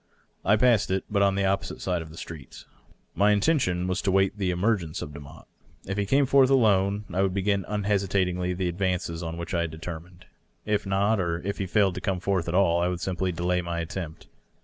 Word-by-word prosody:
I 105 Hz, -, +4 dB
passed 115 Hz, -2 st, +3 dB
it, 95 Hz, 0 st, 0 dB
but 100 Hz, -1 st, +2 dB
on 100 Hz, -1 st, +3 dB
the 100 Hz, 0 st, +1 dB
opposite 95 Hz, +1 st, -1 dB
side 90 Hz, -2 st, -1 dB
of 80 Hz, -, -9 dB
the 80 Hz, -, -13 dB
street. 80 Hz, -6 st, -9 dB, 0.5 s
My 100 Hz, +1 st, +3 dB
intention 100 Hz, -, +1 dB
was 90 Hz, +1 st, -1 dB
to -, -, 0 dB
wait 95 Hz, +1 st, +2 dB
the 100 Hz, -3 st, -1 dB
emei^enoe 90 Hz, -3 st, 0 dB
of 75 Hz, -, -6 dB
Demotte. 70 Hz, -1 st, -11 dB, 0.4 s
If 95 Hz, -, -3 dB
he 100 Hz, -, -1 dB
came 140 Hz, +5 st, +3 dB
forth 135 Hz, 0 st, +5 dB
alone, 105 Hz, -5 st, +3 dB
I 95 Hz, -, +1 dB
would 95 Hz, -1 st, 0 dB
b^in 100 Hz, 0 st, +1 dB
unhesitatingly 95 Hz, -3 st, 0 dB
the 90 Hz, 0 st, -1 dB
advances 90 Hz, -2 st, -2 dB
on 85 Hz, -1 st, -5 dB
which 85 Hz, +2 st, -6 dB
I 85 Hz, -, +1 dB
had 85 Hz, -, -1 dB
determined. 85 Hz, +2 st, -9 dB, 0.4 s
If 105 Hz, -1 st, 0 dB
not, 100 Hz, +3 st, +2 dB
or 85 Hz, -2 st, -1 dB
if 100 Hz, +2 st, -3 dB
he 95 Hz, -, -2 dB
failed 100 Hz, 0 st, +2 dB
to -, -, -6 dB
come 95 Hz, -4 st, -1 dB
forth 95 Hz, -2 st, -1 dB
at 85 Hz, -, -1 dB
all, 85 Hz, -3 st, +3 dB
I 90 Hz, -, +2 dB
would 90 Hz, -1 st, -2 dB
simply 95 Hz, 0 st, -1 dB
delay 90 Hz, +1 st, 0 dB
my 85 Hz, -1 st, -3 dB
attempt. 85 Hz, -1 st, -6 dB
95 Hz, 215 wpm, -26 LUFS, 85-100 Hz, 0.5 s, forth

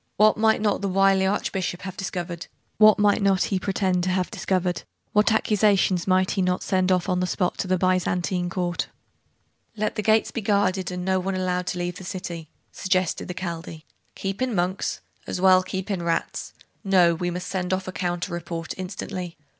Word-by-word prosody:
What 215 Hz, +1 st, +6 dB
might 220 Hz, -1 st, +3 dB
not 210 Hz, -2 st, +1 dB
the 200 Hz, -, -1 dB
wily 195 Hz, 0 st, +4 dB
archbishop 190 Hz, -2 st, -2 dB
have 190 Hz, -1 st, -6 dB
discovered? 175 Hz, -2 st, -5 dB, 0.3 s
What 215 Hz, -1 st, +8 dB
might 205 Hz, 0 st, +3 dB
not 195 Hz, -2 st, +3 dB
he 195 Hz, -, 0 dB
pretend 185 Hz, -2 st, 0 dB
to -, -, 0 dB
have 185 Hz, +1 st, 0 dB
discovered? 185 Hz, -4 st, -1 dB, 0.3 s
What 210 Hz, +1 st, +4 dB
accusations 205 Hz, -4 st, +2 dB
might 185 Hz, 0 st, +3 dB
he 195 Hz, -, 0 dB
not 180 Hz, 0 st, 0 dB
send 185 Hz, -1 st, +1 dB
off 180 Hz, -1 st, +2 dB
on 180 Hz, -2 st, +1 dB
the 180 Hz, -, 0 dB
spot 180 Hz, 0 st, -1 dB
to -, -, -1 dB
the 185 Hz, 0 st, +2 dB
Byzantine 180 Hz, 0 st, 0 dB
Court? 175 Hz, -1 st, -2 dB, 0.9 s
'Let 215 Hz, 0 st, 0 dB
the -, -, +1 dB
gates 220 Hz, +1 st, +3 dB
be 230 Hz, -, -3 dB
guarded, 195 Hz, -3 st, +1 dB
and 180 Hz, -1 st, -4 dB
no 190 Hz, 0 st, +2 dB
one 190 Hz, +1 st, -2 dB
allowed 180 Hz, -1 st, -1 dB
to -, -, -2 dB
leave 175 Hz, 0 st, -3 dB
the -, -, -9 dB
city,' 175 Hz, -4 st, -6 dB, 0.2 s
suggested 185 Hz, -2 st, 0 dB
the 180 Hz, -, -5 dB
Chaldee. 165 Hz, -3 st, -6 dB, 0.3 s
'Keep 195 Hz, +4 st, -4 dB
in 255 Hz, -4 st, 0 dB
monks? 180 Hz, +2 st, -1 dB, 0.3 s
as -, -, -3 dB
well 185 Hz, 0 st, +6 dB
keep 190 Hz, +2 st, -4 dB
in 190 Hz, -3 st, -1 dB
rats! 170 Hz, -1 st, -2 dB, 0.3 s
No; 185 Hz, -4 st, +4 dB
we 175 Hz, +2 st, -2 dB
must 180 Hz, +1 st, -4 dB
send 185 Hz, -1 st, -2 dB
off 185 Hz, 0 st, -1 dB
a -, -, -3 dB
counter 175 Hz, 0 st, -2 dB
report, 170 Hz, -1 st, -4 dB
instantly. 185 Hz, -2 st, -5 dB
185 Hz, 195 wpm, -24 LUFS, 180-195 Hz, 0.9 s, What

